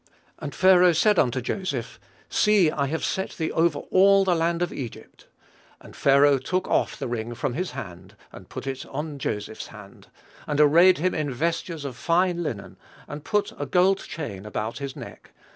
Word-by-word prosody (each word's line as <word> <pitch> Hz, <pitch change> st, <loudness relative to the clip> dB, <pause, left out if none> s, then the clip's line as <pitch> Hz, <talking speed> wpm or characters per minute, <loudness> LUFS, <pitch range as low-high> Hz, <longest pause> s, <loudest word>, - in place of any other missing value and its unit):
And 145 Hz, -, -6 dB
Pharaoh 180 Hz, -2 st, +5 dB
said 205 Hz, +4 st, +3 dB
unto 130 Hz, -1 st, +1 dB
Joseph, 135 Hz, -, -4 dB, 0.3 s
See, 205 Hz, -7 st, +3 dB
I 140 Hz, -2 st, -1 dB
have 160 Hz, +3 st, -2 dB
set 190 Hz, -, -2 dB
thee 160 Hz, -1 st, -2 dB
over 165 Hz, -2 st, +2 dB
all 195 Hz, +1 st, +5 dB
the 185 Hz, -, +3 dB
land 170 Hz, +1 st, 0 dB
of 175 Hz, -, -3 dB
Egypt. 125 Hz, -5 st, -9 dB, 0.5 s
And -, -, -15 dB
Pharaoh 140 Hz, 0 st, +4 dB
took 185 Hz, +8 st, -2 dB
off -, -, 0 dB
his -, -, -4 dB
ring 120 Hz, 0 st, -4 dB
from 125 Hz, +1 st, -2 dB
his 180 Hz, +7 st, -3 dB
hand, 95 Hz, 0 st, -9 dB, 0.2 s
and -, -, -13 dB
put -, -, -7 dB
it 135 Hz, -1 st, -4 dB
upon 150 Hz, +1 st, -6 dB
Joseph's 105 Hz, -3 st, -4 dB
hand, 105 Hz, -2 st, -14 dB, 0.4 s
and 150 Hz, -1 st, -1 dB
arrayed 170 Hz, +5 st, +6 dB
him 180 Hz, +4 st, 0 dB
in 150 Hz, -3 st, -2 dB
vestures 165 Hz, +2 st, -3 dB
of 130 Hz, -3 st, -5 dB
fine 175 Hz, +6 st, +1 dB
linen, 115 Hz, -11 st, -5 dB, 0.3 s
and 145 Hz, 0 st, -8 dB
put 210 Hz, +2 st, -1 dB
a 145 Hz, -, -3 dB
gold 185 Hz, +6 st, +3 dB
chain 110 Hz, -, -7 dB
about 105 Hz, +4 st, -4 dB
his 140 Hz, -1 st, -6 dB
neck. -, -, -11 dB
150 Hz, 180 wpm, -25 LUFS, 130-180 Hz, 0.5 s, arrayed